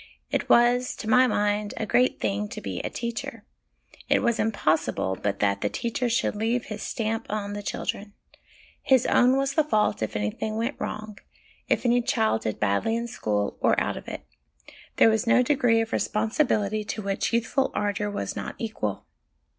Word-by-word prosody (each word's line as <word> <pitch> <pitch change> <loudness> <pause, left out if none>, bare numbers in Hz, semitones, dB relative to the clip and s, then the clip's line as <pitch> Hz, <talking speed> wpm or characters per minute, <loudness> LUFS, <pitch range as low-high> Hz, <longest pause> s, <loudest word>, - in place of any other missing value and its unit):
It - - -1
was 245 +1 +4
to 220 - -7
my 255 +2 +5
mind 210 -1 0
a 220 - -2
great 250 +4 +2
thing 105 0 -1
to - - -7
be 95 -3 -5
a - - -3
teacher; 235 -1 -5 0.6
it - - +3
was 235 -1 +1
impossible 160 - 0
but 100 -1 -1
that 100 -1 +1
the 105 - 0
teacher 235 - -2
should 230 -1 0
leave 230 +3 0
his 210 - -6
stamp 225 0 -2
on 205 -1 -3
the 205 - -4
children. 205 0 -4 0.7
His 260 -2 +3
own 250 +2 +4
was 275 0 0
the 310 - +3
fault 215 - +1
if 110 - -3
anything 105 - -2
went 230 +5 -1
wrong, 215 -1 -5 0.5
if - - +1
any 245 0 +4
child 220 - +1
did 110 - -3
badly 105 - +1
in 235 +1 -2
school 105 - -2
or - - +3
out - - -1
of - - -9
it. - - -7 0.7
There 225 - +6
was 220 +2 0
no 250 +2 +5
degree 245 -4 +3
of 225 - -4
responsibility 215 -2 0
to 215 0 -5
which 195 0 -1
youthful 235 +3 +1
ardour 205 0 -1
was 205 - -4
not - - -5
equal. 160 - -4
220 Hz, 180 wpm, -26 LUFS, 205-240 Hz, 0.7 s, There